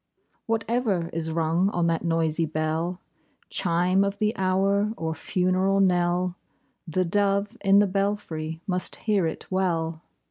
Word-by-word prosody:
Whatever 225 Hz, -6 st, 0 dB
is 160 Hz, 0 st, -2 dB
rung 165 Hz, +3 st, +1 dB
on 175 Hz, -4 st, 0 dB
that 165 Hz, -1 st, 0 dB
noisy 165 Hz, -1 st, +1 dB
bell 160 Hz, +3 st, -2 dB, 0.3 s
— -, -, -39 dB
Chime 180 Hz, +2 st, +2 dB
of 200 Hz, 0 st, -2 dB
the 215 Hz, +2 st, 0 dB
hour 195 Hz, +2 st, +1 dB
or 160 Hz, 0 st, -2 dB
funeral 185 Hz, +3 st, +1 dB
knell 180 Hz, -1 st, +2 dB, 0.2 s
— -, -, -41 dB, 0.2 s
The 185 Hz, +3 st, 0 dB
dove 200 Hz, +3 st, +1 dB
in 195 Hz, 0 st, +5 dB
the 205 Hz, -, +6 dB
belfry 185 Hz, -5 st, -2 dB
must 180 Hz, -2 st, 0 dB
hear 205 Hz, -6 st, +1 dB
it 160 Hz, -, -6 dB
well. 165 Hz, -4 st, -1 dB
185 Hz, 145 wpm, -25 LUFS, 165-200 Hz, 0.3 s, the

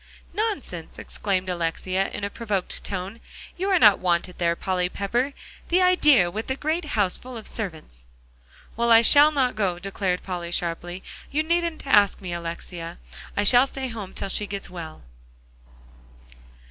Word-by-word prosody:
"Nonsense!" 395 Hz, -, -3 dB
exclaimed 190 Hz, -2 st, -2 dB
Alexia 185 Hz, +2 st, -1 dB
in -, -, -6 dB
a 200 Hz, -, -2 dB
provoked 205 Hz, -5 st, -3 dB
tone; 195 Hz, +3 st, -5 dB, 0.4 s
"you 380 Hz, +3 st, -2 dB
are 380 Hz, -, +4 dB
not 210 Hz, -, +6 dB
wanted 180 Hz, 0 st, 0 dB
there, 170 Hz, -1 st, +2 dB
Polly 180 Hz, 0 st, -1 dB
Pepper; 240 Hz, +9 st, -1 dB, 0.4 s
the 355 Hz, -, +4 dB
idea, 300 Hz, -, +5 dB
with 220 Hz, +4 st, -5 dB
that 265 Hz, +1 st, -3 dB
great 315 Hz, +3 st, -1 dB
house 195 Hz, -3 st, +3 dB
full 255 Hz, -1 st, -9 dB
of 220 Hz, -, -9 dB
servants." 155 Hz, -, -6 dB, 0.7 s
"Well, 235 Hz, +1 st, +1 dB
I 225 Hz, 0 st, +8 dB
shall 290 Hz, +5 st, +7 dB
not 265 Hz, -4 st, +1 dB
go," 190 Hz, -5 st, 0 dB
declared 185 Hz, -1 st, -2 dB
Polly 175 Hz, -2 st, -4 dB
sharply; 175 Hz, +1 st, -3 dB, 0.3 s
"you 305 Hz, +2 st, 0 dB
needn't 335 Hz, -1 st, -1 dB
ask 205 Hz, -7 st, +4 dB
me, 185 Hz, -3 st, -5 dB
Alexia. 170 Hz, 0 st, -6 dB, 0.4 s
I 205 Hz, -, +3 dB
shall 245 Hz, +5 st, +6 dB
stay 265 Hz, -1 st, -4 dB
home 210 Hz, -5 st, -7 dB
till -, -, -4 dB
she 205 Hz, +2 st, 0 dB
gets 200 Hz, -3 st, -6 dB
well." 165 Hz, -3 st, -8 dB
200 Hz, 160 wpm, -24 LUFS, 180-255 Hz, 0.7 s, I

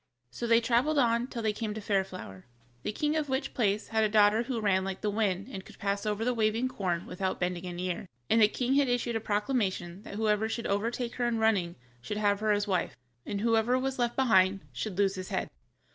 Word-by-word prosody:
So 235 Hz, -, -4 dB
they 230 Hz, 0 st, +5 dB
traveled 250 Hz, +6 st, +2 dB
on 235 Hz, -2 st, +3 dB
till 235 Hz, -4 st, -5 dB
they 215 Hz, -1 st, +1 dB
came 210 Hz, -1 st, -4 dB
to -, -, -4 dB
Fairflower, 190 Hz, -, -3 dB, 0.4 s
the 210 Hz, -, -2 dB
king 300 Hz, +7 st, 0 dB
of 305 Hz, -2 st, -1 dB
which 265 Hz, +2 st, -1 dB
place 210 Hz, -3 st, 0 dB
had 220 Hz, -1 st, +2 dB
a 215 Hz, -, +2 dB
daughter 210 Hz, +1 st, +5 dB
who 240 Hz, -1 st, -2 dB
ran 195 Hz, -3 st, +2 dB
like 190 Hz, 0 st, -4 dB
the 210 Hz, -, 0 dB
wind 200 Hz, -2 st, 0 dB
and 190 Hz, -1 st, -6 dB
could -, -, -15 dB
pass 200 Hz, +1 st, -2 dB
over 210 Hz, +1 st, -1 dB
the 250 Hz, -, +2 dB
waving 225 Hz, +2 st, +1 dB
corn 180 Hz, -7 st, -2 dB
without 185 Hz, +1 st, -3 dB
bending 180 Hz, 0 st, -2 dB
an 175 Hz, -1 st, -6 dB
ear, 180 Hz, +1 st, -3 dB, 0.2 s
and 225 Hz, -, +4 dB
the 210 Hz, -, +8 dB
king 250 Hz, +4 st, -1 dB
had 280 Hz, -1 st, +3 dB
issued 245 Hz, -1 st, 0 dB
a -, -, +1 dB
proclamation 205 Hz, -5 st, -1 dB
that 200 Hz, -, -9 dB
whoever 215 Hz, 0 st, +1 dB
should 230 Hz, +1 st, -3 dB
overtake 230 Hz, +4 st, -1 dB
her 245 Hz, -1 st, +1 dB
in 235 Hz, -1 st, 0 dB
running 205 Hz, -6 st, +2 dB, 0.3 s
should 210 Hz, +12 st, -4 dB
have 205 Hz, -1 st, +2 dB
her 210 Hz, -1 st, +2 dB
to 205 Hz, -, -3 dB
wife, 185 Hz, -3 st, -1 dB, 0.3 s
but 200 Hz, -1 st, -2 dB
whoever 230 Hz, +2 st, +3 dB
was 265 Hz, 0 st, -2 dB
left 240 Hz, -1 st, +1 dB
behind 195 Hz, -7 st, +4 dB
should 180 Hz, -, -4 dB
lose 200 Hz, -1 st, +3 dB
his 185 Hz, -1 st, -6 dB
head. -, -, -2 dB
215 Hz, 230 wpm, -29 LUFS, 195-235 Hz, 0.4 s, the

